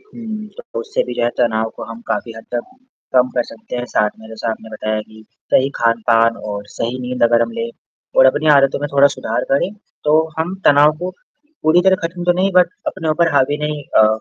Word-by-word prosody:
हुँ। 225 Hz, -, -8 dB
तो -, -, -6 dB
उससे 460 Hz, +2 st, -1 dB
भी -, -, -5 dB
जो -, -, -1 dB
है -, -, +3 dB
तनाव 110 Hz, -2 st, +1 dB
को -, -, -6 dB
हम 115 Hz, 0 st, -9 dB
काफ़ी 115 Hz, -, -2 dB
हद 110 Hz, -, -10 dB
तक 120 Hz, -, -3 dB, 0.4 s
कम 125 Hz, 0 st, +5 dB
कर 120 Hz, -, +2 dB
सकते 115 Hz, +2 st, -8 dB
हैं। 120 Hz, -, -2 dB
साथ 105 Hz, -3 st, +1 dB
में 110 Hz, -, -13 dB
जैसा 110 Hz, +1 st, -4 dB
आपने 110 Hz, 0 st, -7 dB
बताया 110 Hz, 0 st, -2 dB
कि 110 Hz, 0 st, -14 dB, 0.3 s
सही 135 Hz, -, +4 dB
खान-पान 115 Hz, 0 st, +2 dB
और 100 Hz, -1 st, -6 dB
सही 120 Hz, +3 st, -2 dB
नींद 125 Hz, 0 st, -4 dB
अगर 115 Hz, 0 st, +5 dB
हम -, -, -2 dB
लें, 230 Hz, 0 st, -2 dB, 0.5 s
और -, -, +8 dB
अपनी 155 Hz, -, +2 dB
आदतों 135 Hz, 0 st, +3 dB
में 145 Hz, -, -2 dB
थोड़ा 140 Hz, 0 st, +6 dB
सुधार -, -, -2 dB
करें, 140 Hz, +7 st, +2 dB, 0.3 s
तो 155 Hz, +2 st, +3 dB
हम 175 Hz, +4 st, -1 dB
तनाव 145 Hz, +1 st, +6 dB
को 180 Hz, +1 st, -3 dB, 0.5 s
पूरी 165 Hz, +3 st, +5 dB
तरह 190 Hz, 0 st, +5 dB
ख़त्म 175 Hz, +1 st, -7 dB
तो 175 Hz, -, +4 dB
नहीं 195 Hz, -, +2 dB
बट 180 Hz, -1 st, +6 dB, 0.2 s
अपने 160 Hz, -, -3 dB
ऊपर 165 Hz, +1 st, +2 dB
हावी 140 Hz, +1 st, +3 dB
नहीं 150 Hz, -1 st, -3 dB, 0.2 s
अ -, -, +6 dB
135 Hz, 220 wpm, -18 LUFS, 115-175 Hz, 0.5 s, और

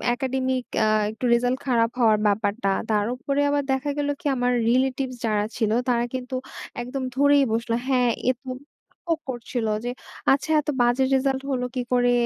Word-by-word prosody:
Academic 260 Hz, 0 st, -1 dB, 0.2 s
আ -, -, +3 dB, 0.2 s
একটু 225 Hz, +3 st, -5 dB
result 245 Hz, +2 st, +2 dB
খারাপ 230 Hz, -2 st, +3 dB
হওয়ার 220 Hz, -2 st, +5 dB
ব্যাপারটা। 205 Hz, 0 st, 0 dB, 0.2 s
তার 210 Hz, -1 st, +2 dB
উপরে 275 Hz, +3 st, -1 dB
আবার 285 Hz, 0 st, +1 dB
দেখা 265 Hz, +2 st, 0 dB
গেল 290 Hz, 0 st, 0 dB
কি? -, -, -23 dB
আমার 245 Hz, 0 st, +1 dB, 0.2 s
রিলেটিভস 260 Hz, +1 st, +1 dB
যারা 210 Hz, -1 st, +1 dB
ছিল 215 Hz, -2 st, +1 dB, 0.2 s
তারা 240 Hz, 0 st, +2 dB
কিন্তু 255 Hz, 0 st, -4 dB, 0.5 s
একদম 260 Hz, +2 st, -4 dB
ধরেই 285 Hz, 0 st, +5 dB
বসলো, 230 Hz, 0 st, 0 dB
হ্যাঁ, 250 Hz, -2 st, +3 dB, 0.2 s
এত 250 Hz, -, -10 dB, 0.7 s
হোক 330 Hz, -1 st, +1 dB
করছিল 240 Hz, -2 st, -3 dB, 0.2 s
যে, -, -, -1 dB, 0.4 s
"আচ্ছা 285 Hz, +3 st, -2 dB
এত 295 Hz, -, -6 dB
বাজে 240 Hz, +2 st, +3 dB
রেজাল্ট 265 Hz, 0 st, +1 dB
হলো 250 Hz, -1 st, -1 dB
কি 250 Hz, -, 0 dB
করে? 245 Hz, 0 st, +3 dB
250 Hz, 165 wpm, -24 LUFS, 235-265 Hz, 0.7 s, হওয়ার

